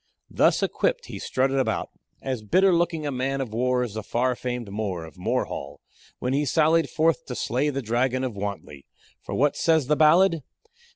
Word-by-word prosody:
Thus - - +3
equipped, - - 0
he - - -5
strutted 135 +1 0
about, 130 - -1 0.3
as 130 -4 -3
bitter 185 - +3
looking 170 -2 0
a 145 - -1
man 135 +1 -2
of 125 -5 -4
war 125 +2 +1
as 120 -4 -5
the 110 - -4
far 125 +4 0
famed 120 -4 -5
More, 100 -5 -3
of 80 - -13
Morehall, 70 +2 -3 0.4
when 125 +1 -2
he 145 +2 +1
sallied 160 +3 +2
forth 160 -3 +1
to 125 - -5
slay 130 +6 0
the 135 -2 -3
dragon 125 +3 0
of 125 -5 -3
Wantley. 100 -8 -6 0.3
For - - -6
what 145 +2 +2
says 160 -4 +2
the 150 +3 +2
ballad? 165 +2 +4
130 Hz, 185 wpm, -25 LUFS, 120-155 Hz, 0.4 s, ballad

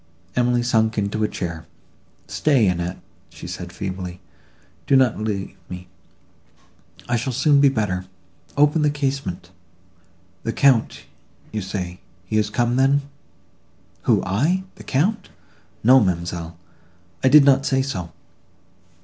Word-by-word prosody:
Emily 125 0 +2
sunk 110 -2 +1
into 105 +1 -1
a - - +3
chair. 80 -5 -5 0.6
"Stay, 135 -9 +2
Annette," 90 0 -1 0.3
said - - -8
she, - - -17
feebly, 90 -2 -5 0.7
"do 140 - +4
not 130 -5 +3
leave 105 -3 -3
me—I 90 +5 -11
shall 120 +3 -1
soon 140 +3 +3
be 140 - +6
better; 105 -7 -1 0.5
open 150 +2 +4
the 150 - +3
casement.—The 90 - -6
Count, 135 -5 +3 0.5
you 110 - -3
say—he 90 0 -6
is 105 -1 +2
come, 120 +2 0
then?" 140 +2 +3 1.0
"Who, - - +3
I!—the 170 - -1
Count! 190 +9 0 0.5
No, 130 +4 +7
ma'amselle, 85 -4 -2 0.7
I 130 - +5
did 145 0 +8
not 135 -1 +4
say 135 0 +2
so." 90 - -4
110 Hz, 115 wpm, -22 LUFS, 90-135 Hz, 1.0 s, did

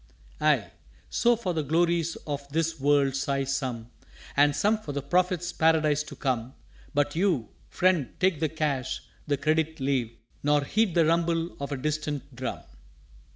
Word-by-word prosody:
"_Ay; 150 -8 +2 0.4
so, 240 0 +3
for 195 -6 -2
the 160 - 0
Glories 165 +2 +1
of 140 -1 -4
this 165 +1 -1
World 140 -1 +3
sigh 140 0 0
some, 130 -4 -3 0.4
And 145 0 +4
some 210 +7 +2
for 150 -9 -6
the 140 - -2
Prophet's 180 +3 +1
Paradise 155 -2 +3
to 150 - -8
come; 130 -2 -2 0.4
But 145 0 0
you, 165 - +1 0.2
Friend, 180 -7 +2
take 185 -5 +2
the 160 -1 +1
Cash 145 -4 -2 0.2
the 145 -1 +1
Credit 160 +2 0
leave, 130 -4 -1 0.2
Nor 145 0 +3
heed 210 +4 +1
the 165 -2 +5
rumble 165 +1 +1
of 140 0 -4
a 140 - -1
distant 150 -1 -3
Drum! 130 +1 -4
150 Hz, 155 wpm, -27 LUFS, 140-165 Hz, 0.4 s, the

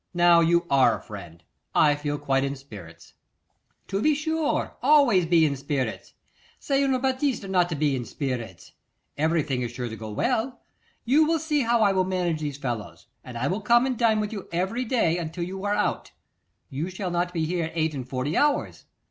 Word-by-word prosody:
Now, 175 -1 +6
you 170 +1 +3
are 135 -4 +4
a - - -14
friend; 90 -6 -10 0.3
I 150 -1 +5
feel 145 0 -3
quite 135 -2 0
in 140 0 -2
spirits.' 95 -12 -13 0.7
'To 195 +1 -2
be 305 +4 +3
sure! 315 +1 -1
always 255 - +4
be 165 -2 +4
in 140 -2 0
spirits. 135 -3 -4 0.4
C'est 275 -1 0
une 265 -2 +1
bêtise 265 -4 -1
not 180 -2 +2
to 165 - -2
be 145 -2 +1
in 125 - -3
spirits. 125 - -5 0.4
Everything 155 -4 0
is 120 - -2
sure 120 0 -5
to 110 - -6
go 110 0 -8
well. 225 - -1 0.5
You 295 +6 +4
will 330 0 +2
see 300 -2 0
how 235 -2 +2
I 200 - +4
will 190 -1 +2
manage 180 -3 -1
these 145 -2 -4
fellows, 110 -11 -5 0.2
and 125 -2 -8
I 120 - -2
will 190 +8 -1
come 235 +4 +4
and 260 -1 -1
dine 225 -2 +2
with 210 0 -3
you 200 -3 -7
every 190 +9 -1
day 220 -9 +1
until 170 +1 -4
you 190 +2 -6
are 205 0 +1
out: 210 - -2 0.6
you 150 +7 -3
shall 185 0 -4
not 175 +1 -1
be 165 -3 -1
here 170 -1 -2
eight 160 -1 0
and 130 -3 -6
forty 130 +5 -2
hours. 295 -1 0
170 Hz, 200 wpm, -25 LUFS, 140-220 Hz, 0.7 s, Now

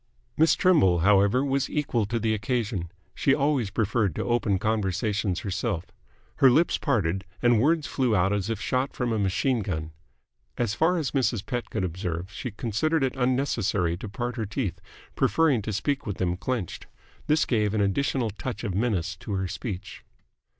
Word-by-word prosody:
Miss 160 +1 +4
Trimble, 95 - +4
however, 100 +7 +4
was 135 -1 0
equal 125 -8 0
to 115 +2 -1
the 110 -1 +1
occasion. 105 -6 -2 0.2
She 135 - +2
always 140 -7 +1
preferred 105 -4 0
to - - -2
open 120 -5 +1
conversations 100 -2 -1
herself. 95 -1 -2 0.5
Her 135 - +7
lips 155 +7 +3
parted, 95 - 0 0.2
and 120 -3 +4
words 155 +3 +2
flew 125 -5 +1
out 95 +1 +2
as 100 0 -1
if 115 -3 -2
shot 130 +4 -1
from 120 -2 -1
a 110 - 0
machine 110 +6 +1
gun. 80 -7 -3 0.7
As 115 -4 0
far 165 +9 +2
as 155 -5 -1
Mrs. 120 -6 0
Pett 120 +3 -3
could - - -2
observe, 90 +1 -3
she 125 - -4
considered 120 +8 0
it 130 -1 0
unnecessary 125 -9 +1
to 105 - -7
part 120 +5 -4
her 110 - -1
teeth, 105 -2 -3 0.3
preferring 140 0 +3
to 110 - -4
speak 135 +7 -1
with 100 - -3
them 90 -1 0
clenched. 110 -1 -4 0.4
This 150 0 +3
gave 110 -3 +1
an 105 - +2
additional 115 +3 0
touch 120 +5 -6
of 100 -5 -2
menace 95 -4 0
to 100 - -6
her 95 -1 -1
speech. 95 0 -6
110 Hz, 175 wpm, -26 LUFS, 95-130 Hz, 0.7 s, Her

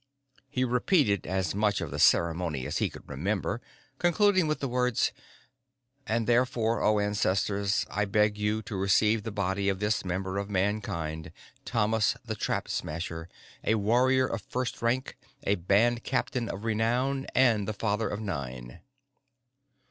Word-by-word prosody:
He 130 -2 0
repeated 125 - +2
as 95 -2 -1
much 105 0 +1
of 85 -5 -4
the - - -4
ceremony 85 -5 +2
as - - -2
he - - +1
could - - -13
remember, 100 - -2 0.4
concluding 185 0 +3
with 155 - -1
the 140 - -2
words: 125 -2 +1 1.0
"_And 115 +1 0
therefore, 120 -1 +2
O 105 0 +3
ancestors, 100 0 +1
I 105 - -1
beg 105 +1 +2
you 105 +1 -1
to 105 - -6
receive 105 +3 +3
the 110 - -5
body 100 0 0
of 95 -1 -1
this 105 +1 0
member 95 +1 -2
of 100 0 -4
Mankind, 85 -6 -2 0.3
Thomas 110 -2 +1
the - - -3
Trap - - -2
Smasher, 80 +1 -4 0.3
a 110 - +2
warrior 125 +5 +3
of - - -3
the - - -31
first 125 0 -3
rank, 120 +3 -1 0.3
a 100 - +2
band 105 +6 +2
captain 125 -2 -1
of 100 - -5
renown 120 +5 0
and 115 -6 +4
the - - 0
father 105 0 -1
of 105 - -4
nine. 65 - -5
105 Hz, 155 wpm, -28 LUFS, 95-120 Hz, 1.0 s, and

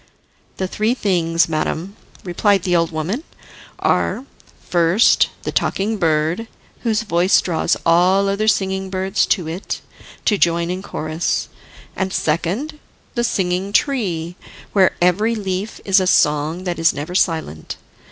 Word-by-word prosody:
"The 190 - -1
three 215 +5 0
things, 170 -7 +1
madam," 165 +4 -2 0.3
replied 195 +1 +1
the 180 -2 +1
old 165 -1 +2
woman, 170 - -3 0.5
"are, 260 - 0 0.4
first, 175 +5 +4
the - - -3
Talking 215 +3 0
Bird, 165 +4 0 0.3
whose 225 -2 0
voice 180 -2 +3
draws 170 -3 0
all 180 +4 +4
other 200 +2 0
singing 190 -2 +1
birds 190 +2 0
to 180 -6 0
it, 170 +5 -4 0.5
to 205 -3 +2
join 170 0 +2
in 185 +1 -4
chorus. 155 -3 -2 0.5
And 190 0 -2
second, 190 - -1 0.3
the 240 - 0
Singing 190 -3 -1
Tree, 180 - 0 0.4
where 190 -3 +4
every 210 +6 +2
leaf 195 0 -4
is 195 0 +5
a 185 - 0
song 150 +2 +2
that 175 -2 -3
is 165 -1 +3
never 145 +5 -5
silent. 160 - -1
185 Hz, 135 wpm, -19 LUFS, 165-200 Hz, 0.5 s, is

